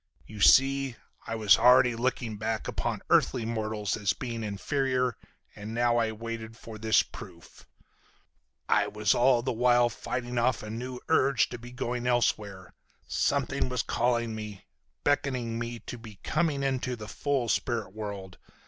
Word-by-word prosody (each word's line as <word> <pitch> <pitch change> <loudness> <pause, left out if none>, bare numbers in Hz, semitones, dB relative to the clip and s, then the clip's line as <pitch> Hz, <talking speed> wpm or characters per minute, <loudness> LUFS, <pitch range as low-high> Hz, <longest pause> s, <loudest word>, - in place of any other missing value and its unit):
You 105 -2 -9
see, 135 +2 +5 0.3
I 115 - -2
was 105 -3 +5
already 125 -1 +6
looking 120 -2 -2
back 110 +1 -2
upon - - -3
earthly 120 -3 +3
mortals 110 -3 -2
as 105 -3 0
being 115 -3 -5
inferior, 125 +4 -1 0.4
and 105 +2 -7
now 120 0 +3
as 115 - +2
I - - -3
waited 115 0 -6
for 110 -2 -10
this 110 -1 +4
proof 85 -1 -13 1.0
I - - +3
was 105 -1 +1
all 120 -1 +3
the 130 - -1
while 120 +1 +4
fighting 120 +1 -3
off 120 -1 +1
a 105 - -6
new 125 +2 -6
urge 140 -7 +3
to 120 - -7
be 120 +1 -10
going 125 -1 -3
elsewhere. 105 -6 0 0.3
Something 140 -1 0
was 125 -2 -1
calling 120 -1 0
me, 105 -3 -7 0.4
beckoning 125 -5 0
me 120 0 -4
to 120 - -8
be 110 -2 -11
coming 155 -4 0
into 130 -2 -1
the 105 -2 -9
full 135 +1 -1
spirit 115 -4 -1
world. 100 -3 -7
120 Hz, 155 wpm, -28 LUFS, 110-125 Hz, 1.0 s, already